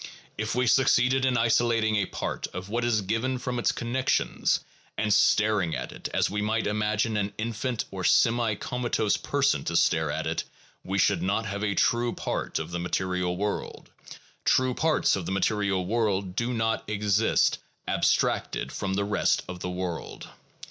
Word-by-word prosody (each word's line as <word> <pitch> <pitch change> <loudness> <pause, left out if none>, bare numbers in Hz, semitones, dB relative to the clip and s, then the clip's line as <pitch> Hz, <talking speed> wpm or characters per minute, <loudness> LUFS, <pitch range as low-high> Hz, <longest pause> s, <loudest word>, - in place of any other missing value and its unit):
If 110 +1 -3
we 125 0 +2
succeeded 130 +1 +3
in 130 -2 +2
isolating 115 -1 +2
a 100 -2 +1
part - - -4
of 90 +2 -6
what 120 +3 -1
is 120 -3 +2
given 115 +6 -1
from 125 -1 -3
its - - +2
connections, 130 +3 0 0.4
and 105 -1 +1
staring 105 -6 +3
at - - -5
it - - -6
as - - +2
we 105 +1 -2
might 110 +2 0
imagine 105 +1 0
an 100 0 -1
infant 115 +2 -2
or 95 -1 -5
semi 115 +1 +3
comatose 120 -2 -1
person 140 - +1
to - - -2
stare - - +2
at - - -2
it, - - -1 0.4
we 95 +1 -2
should 95 -2 +3
not 100 +5 0
have 100 0 -4
a 100 -2 0
true 120 0 +2
part - - -3
of 80 +2 -4
the 85 - -3
material 90 0 -1
world; 105 +1 -4 0.5
true 130 0 +3
parts 160 +4 +2
of 95 -4 -4
the - - -2
material 95 -1 0
world 100 -3 0
do 120 +3 -1
not 115 -2 0
exist 105 +1 +2 0.3
abstracted - - 0
from 95 -1 -3
the 100 0 0
rest 105 0 +1
of 90 -1 -7
the 90 - -4
world. 90 -2 -5
105 Hz, 170 wpm, -27 LUFS, 95-120 Hz, 0.5 s, succeeded